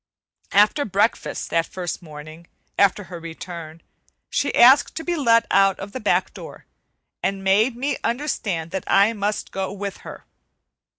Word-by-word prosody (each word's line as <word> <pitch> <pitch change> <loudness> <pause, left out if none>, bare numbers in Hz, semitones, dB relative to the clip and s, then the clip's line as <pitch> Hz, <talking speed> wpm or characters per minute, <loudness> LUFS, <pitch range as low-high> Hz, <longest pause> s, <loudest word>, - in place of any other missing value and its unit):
After 210 +9 +4
breakfast 205 0 -1
that 165 0 +1
first 180 -1 -5
morning 155 +1 -11 0.3
after 200 +1 +2
her 175 -1 -9
return, 165 -1 -9 0.5
she 280 - 0
asked 265 +4 +6
to 325 - -5
be 350 +1 -1
let 230 -7 +3
out 195 -1 +4
of 200 +1 -7
the 260 - -6
back - - 0
door, - - -11 0.6
and 195 0 -2
made 210 +6 +3
me 270 +3 -2
understand 210 - -2
that 190 - -4
I 200 +3 +4
must 205 0 -3
go 190 0 -3
with 200 0 -5
her. - - -11
195 Hz, 155 wpm, -22 LUFS, 175-230 Hz, 0.6 s, asked